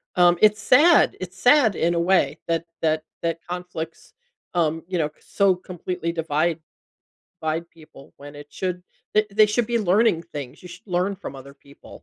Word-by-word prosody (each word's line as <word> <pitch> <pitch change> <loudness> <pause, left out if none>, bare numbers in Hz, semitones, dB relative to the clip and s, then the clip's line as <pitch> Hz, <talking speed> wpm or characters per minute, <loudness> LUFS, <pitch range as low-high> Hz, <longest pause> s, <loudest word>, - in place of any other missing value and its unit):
um, 175 -1 +5
it's 210 0 +4
sad, 295 +8 +5
it's 185 0 -7
sad 245 -5 +5
in 170 +1 +1
a 170 - 0
way 185 +2 +2
that 165 0 -1 0.2
that 155 -1 +1 0.2
that 165 0 -2
conflicts, 180 -2 -7 0.4
um, 165 -2 0
you 185 - -2
know, 155 -3 0
so 195 -2 +1
completely 180 -1 -5
divide 165 0 -1 0.8
divide 160 +2 -2
people 155 -4 -17
when 145 +1 -12
it 145 0 -11
should 180 -1 -4 0.3
they 215 0 +3
they 215 +2 +5
should 220 +2 0
be 235 0 0
learning 200 -3 +2
things. 145 -5 -9
You 180 - -10
should 190 +5 -13
learn 185 +2 0
from 185 -7 -8
other 135 +1 -11
people, 140 0 -16
175 Hz, 175 wpm, -23 LUFS, 160-200 Hz, 0.8 s, um